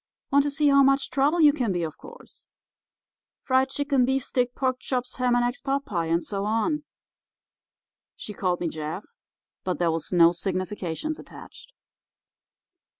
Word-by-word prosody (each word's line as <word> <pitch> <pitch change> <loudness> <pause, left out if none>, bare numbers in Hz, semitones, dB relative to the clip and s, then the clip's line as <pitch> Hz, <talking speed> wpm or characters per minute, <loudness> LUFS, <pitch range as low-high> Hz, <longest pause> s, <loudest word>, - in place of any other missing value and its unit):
Want 280 0 +5
to - - +1
see 295 0 +2
how 280 0 +6
much 275 0 +3
trouble 285 +6 +2
you 295 -2 +7
can 245 -8 -1
be, 175 -2 -1
of 160 -1 -4
course. - - -13 1.0
Friedchickenbeefsteakporkchopshamandeggspotpie'—and 255 - 0
so 200 -1 -3
on. 225 +9 0 1.3
She 210 - -8
called 180 -3 -1
me 175 - 0
Jeff, 155 +4 -5 0.6
but 180 -1 -2
there 170 -2 +1
was 160 -1 -4
no 170 -2 +6
significations 185 - -3
attached. - - -13
245 Hz, 110 wpm, -25 LUFS, 180-275 Hz, 1.3 s, you